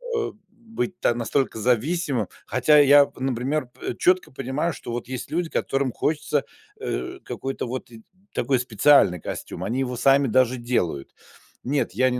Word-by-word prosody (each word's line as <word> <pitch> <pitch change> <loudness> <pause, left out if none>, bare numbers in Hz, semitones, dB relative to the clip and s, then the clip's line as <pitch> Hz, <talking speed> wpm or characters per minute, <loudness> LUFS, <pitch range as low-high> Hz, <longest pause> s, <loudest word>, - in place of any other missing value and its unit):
э, 445 - -1 0.2
быть 225 -4 -5
та - - +2
настолько 120 0 -1
зависимым. 125 - 0 0.2
Хотя 150 +4 +4
я, 145 0 +6
например, 130 +2 -1
пэ 120 - -6
четко 185 -4 +2
понимаю, 135 +6 -2
что - - -8
вот 120 0 -4
есть 130 -1 -6
люди, 170 0 -1
которым 135 -1 -1
хочется, 150 -2 -1 0.3
э, 370 -4 -4
какой-то 135 -2 -4
вот 125 0 -6
и 115 -1 -12 0.3
такой 130 +1 +1
специальный 120 - +4
костюм. 90 - -6
Они 115 +7 -2
его 125 -1 -2
сами 135 +2 +4
даже 130 +1 +3
делают. 90 - -2 0.5
Нет, 135 -8 -1
я 130 +4 +3
не 125 - -2
130 Hz, 160 wpm, -24 LUFS, 120-150 Hz, 0.5 s, я